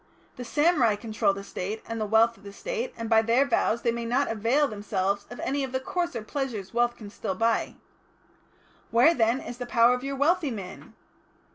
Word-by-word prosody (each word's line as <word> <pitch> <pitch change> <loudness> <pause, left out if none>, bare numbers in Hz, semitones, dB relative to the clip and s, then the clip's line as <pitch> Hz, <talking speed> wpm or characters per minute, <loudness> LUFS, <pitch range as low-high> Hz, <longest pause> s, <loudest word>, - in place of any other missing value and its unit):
The 250 - -7
samurai 290 -4 +3
control 215 -1 0
the 195 0 -6
State 200 +3 -5
and 230 -1 -4
the 215 - -1
wealth 225 +2 +4
of 195 - -21
the 200 0 -10
State, - - -4
and 230 -1 -4
by 220 0 +5
their 235 +5 +3
vows 235 -4 +1
they 235 - +2
may 235 0 -4
not 245 +4 0
avail 230 +7 +2
themselves 200 -2 -2
of 245 - -9
any 275 +1 -1
of 265 -1 -5
the 260 - +1
coarser 265 -4 -3
pleasures 220 -7 -4
wealth 240 0 +2
can 205 -3 -10
still 190 - -4
buy. 225 +3 0 1.1
Where, 245 +9 +5
then, 230 -2 +2
is 245 -2 -8
the 245 - -5
power 235 0 +5
of 250 +1 -3
your 275 0 -3
wealthy 300 +2 +2
man?" 195 -6 -8
235 Hz, 205 wpm, -27 LUFS, 215-265 Hz, 1.1 s, by